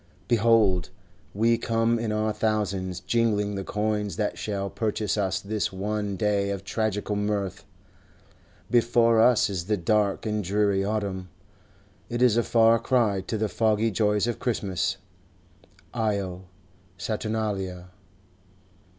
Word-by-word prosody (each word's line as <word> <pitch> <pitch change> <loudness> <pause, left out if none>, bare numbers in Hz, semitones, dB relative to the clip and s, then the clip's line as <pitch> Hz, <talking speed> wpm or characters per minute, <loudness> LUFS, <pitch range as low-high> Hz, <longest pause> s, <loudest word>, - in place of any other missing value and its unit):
Behold, 110 -6 +3 0.4
we 115 +3 +2
come 115 0 +1
in 115 -1 -2
our 110 0 0
thousands, 100 -5 -1
jingling 105 -1 +1
the 95 -1 -3
coins 105 -2 -2
that 105 +2 -1
shall 100 -2 -3
purchase 105 0 -2
us 100 -3 0
this 105 +1 -2
one 100 +1 -3
day 100 -1 +1
of 100 -1 -4
tragical 105 0 -2
mirth. 100 -2 -2 1.1
Before 115 -1 +4
us 120 0 +5
is 95 -4 -4
the 105 +2 0
dark 100 +3 +1
and 105 -1 -1
dreary 100 +1 +1
autumn; 100 -3 -3 0.8
it 120 +1 0
is 120 -4 +5
a 120 - +4
far 115 0 +4
cry 115 -5 +1
to 110 - -2
the 110 +1 0
foggy 110 +1 +1
joys 105 +1 +1
of 120 -1 -2
Christmas. 105 -7 -1 1.0
Io 100 -5 -2 0.5
Saturnalia! 105 -5 -3
105 Hz, 125 wpm, -26 LUFS, 100-110 Hz, 1.1 s, us